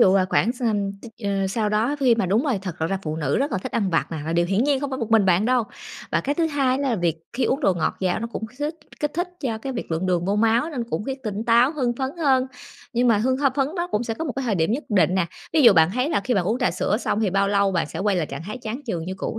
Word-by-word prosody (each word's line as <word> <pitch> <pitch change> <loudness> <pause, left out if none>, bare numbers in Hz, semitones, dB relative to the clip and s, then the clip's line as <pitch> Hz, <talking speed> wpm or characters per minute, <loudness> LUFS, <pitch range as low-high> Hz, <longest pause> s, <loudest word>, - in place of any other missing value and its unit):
dụ, 190 - +6
à, 190 -1 +4
khoảng 235 - +2
s 250 - -16
ừm, 205 -4 0
t - - -12 0.2
à, 195 -1 0
sau 210 +2 0
đó 225 +7 +1
khi 250 -4 +5
mà 225 -4 0
đúng 210 - +2
rồi, 265 -9 +1
thật 180 -4 -5
l - - +2
ra 195 +3 -1
phụ 155 -2 -3
nữ 150 -3 0
rất 280 +2 -1
là - - 0
thích - - -6
ăn 200 -4 0
vặt 165 - +1
nè, - - -3
là 165 - -2
điều 170 +1 +2
hiển 195 +7 +1
nhiên 285 -2 +2
không 285 -1 -3
phải 260 - -3
một 230 -3 -4
mình 220 -3 +5
bạn 185 +2 +3
đâu. 245 -1 +2 0.5
Và - - +3
cái 285 - -1
thứ 330 +1 +1
hai 275 -4 +1
á 280 - -2
là 230 - +1
việc 170 -3 0 0.2
khi 255 +2 0
uống 275 +4 0
đồ 195 -9 +3
ngọt 160 -2 -1
vào 185 -2 +1
nó 230 - -2
cũng 220 - -4
kích 245 +4 -20
thích 300 +2 -1 0.3
kích 295 -1 0
thích 350 +2 -1
cho 230 -6 -2
cái 265 +4 -5
việc 235 - -5
lượng 165 +3 -1
đường 175 -1 +1
vô 200 +2 0
máu 230 +7 +2
nên 250 -6 -3
cũng 210 - -2
khiến 270 +1 -4
tỉnh 215 0 -3
táo, 235 +4 +4
hưng 255 -6 0
phấn 265 0 -1
hơn. 265 -5 +3 0.5
Nhưng 245 +1 +2
mà 225 -3 +4
hưng 255 +4 +1
h 285 - -6
phấn 275 -1 +1
đó 345 0 -1
cũng 210 - 0
sẽ 225 - -2
có 325 - -4
một 285 - -3
cái 270 - -1
thời 225 -4 +1
điểm 165 -1 +1
nhất 280 +6 -2
định 190 -3 +3
nè. 185 -3 +1 0.3
Ví 315 - +4
dụ 235 -5 +9
bạn 160 -1 +5
thấy 255 +4 +1
là 305 - +1
khi 245 - +1
bạn 190 -4 +1
uống 225 +6 0
trà 250 - +2
sữa 185 +3 0
xong 220 -2 -1
thì 205 -4 +1
bao 195 +1 +2
lâu 200 -1 +2
bạn 170 - 0
sẽ - - -7
quay 200 -1 +1
lại 165 - 0
trạng 140 +2 -7
thái 215 +6 -6
chán 235 +3 -5
chường 170 -8 -3
như 185 +2 -4
cũ 225 - -4
225 Hz, 330 wpm, -23 LUFS, 190-260 Hz, 0.5 s, dụ